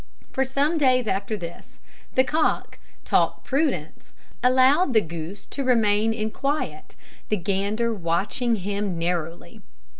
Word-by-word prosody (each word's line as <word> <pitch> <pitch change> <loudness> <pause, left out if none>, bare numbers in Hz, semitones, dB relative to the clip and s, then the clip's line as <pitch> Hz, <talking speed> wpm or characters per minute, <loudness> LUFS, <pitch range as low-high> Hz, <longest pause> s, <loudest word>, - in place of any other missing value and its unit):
For 265 - +1
some 280 +5 0
days 255 -4 +3
after 200 +2 -1
this, 170 -3 -10 0.4
the 260 - +6
cock, 310 +4 0 0.3
taught - - +1
prudence, 270 - -2 0.3
allowed 260 +5 +4
the 220 - +5
goose 165 +3 -7
to 275 - -4
remain 225 -3 +3
in 220 -1 -2
quiet, 280 +6 -3 0.3
the 215 - +1
gander 200 +5 0
watching 205 +6 0
him 200 -2 -2
narrowly. 170 0 -3
220 Hz, 125 wpm, -24 LUFS, 190-260 Hz, 0.4 s, the